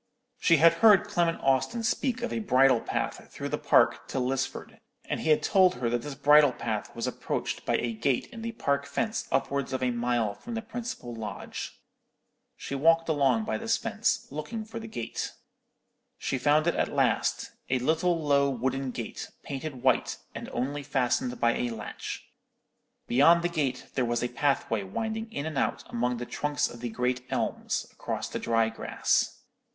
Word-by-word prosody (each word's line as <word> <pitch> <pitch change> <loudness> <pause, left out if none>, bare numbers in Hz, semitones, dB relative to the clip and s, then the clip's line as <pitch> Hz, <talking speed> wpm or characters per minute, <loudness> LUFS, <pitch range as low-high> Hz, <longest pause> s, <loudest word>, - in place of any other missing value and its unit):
She 170 - +5
had 165 +2 +7
heard 210 -5 +8
Clement 170 -1 0
Austin 135 - +1
speak 250 +1 0
of 240 - -2
a - - -1
bridle 135 - +4
path - - -3
through - - -5
the - - -2
park - - +3
to - - -4
Lisford, 130 +1 -2 0.3
and - - -2
he - - -2
had 155 - +4
told 185 -5 +4
her 120 -2 -1
that 120 0 0
this 145 +2 -6
bridle 145 -1 +6
path 110 -3 -4
was 115 0 -2
approached 125 - -3
by - - +2
a 120 -1 -2
gate 120 +3 0
in 230 -3 -8
the 230 0 -4
park 140 -8 0
fence 225 0 -2
upwards 140 -1 0
of 130 - -1
a 125 - +2
mile 120 -3 0
from 230 - -8
the 225 - -3
principal 235 - -6
lodge. 110 -3 -6 0.8
She - - -6
walked 165 +4 +3
along 135 -7 +3
by 110 0 -2
this - - +1
fence, - - 0
looking 215 +10 -5
for 225 +1 -7
the 225 - -8
gate. 120 - -4 0.8
She 135 - -2
found 150 +3 +3
it 170 - +2
at - - 0
last; - - +1 0.2
a 130 - +2
little 160 +6 +1
low 140 -2 +3
wooden 130 +1 -1
gate, 120 -2 -6
painted 135 -2 -6
white, 130 -2 +2 0.2
and - - -7
only 140 +4 -2
fastened 125 -2 0
by 120 0 +3
a 120 - -1
latch. 110 -3 -6 0.8
Beyond 165 +7 +5
the 175 - +1
gate 140 -7 -1
there 130 - +1
was 120 0 0
a 120 - 0
pathway 120 -4 0
winding 220 - -4
in 140 -8 -4
and 155 -3 -2
out - - -1
among 125 +1 0
the 120 - -4
trunks 150 +3 -1
of 120 - -10
the 120 0 -3
great 125 +2 -1
elms, - - -1
across - - -4
the - - -4
dry 115 -1 +2
grass. 115 - 0
135 Hz, 185 wpm, -28 LUFS, 120-165 Hz, 0.8 s, heard